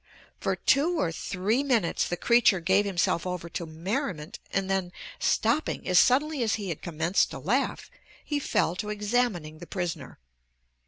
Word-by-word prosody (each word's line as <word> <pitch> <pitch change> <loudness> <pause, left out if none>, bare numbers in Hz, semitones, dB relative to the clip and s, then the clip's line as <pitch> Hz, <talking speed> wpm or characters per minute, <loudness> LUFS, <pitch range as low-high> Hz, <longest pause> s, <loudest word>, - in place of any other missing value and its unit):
For - - 0
two 330 +5 +2
or 165 - +1
three 200 +8 -1
minutes 240 -11 +1
the 175 - -2
creature 235 -4 +4
gave 190 +4 +3
himself 180 -2 0
over 180 -2 -4
to 170 0 -5
merriment 180 - -4
and 195 0 0
then, 190 -2 -1 0.3
stopping 235 +8 0
as 180 -2 +5
suddenly 290 +2 +3
as 220 -3 +1
he 205 -3 -5
had 165 - -4
commenced 165 +2 +1
to - - -7
laugh, - - -1 0.3
he 295 -1 -1
fell 180 - 0
to 210 - -4
examining 210 -7 -1
the 175 - -10
prisoner. 170 -7 -4
190 Hz, 160 wpm, -27 LUFS, 170-235 Hz, 0.3 s, as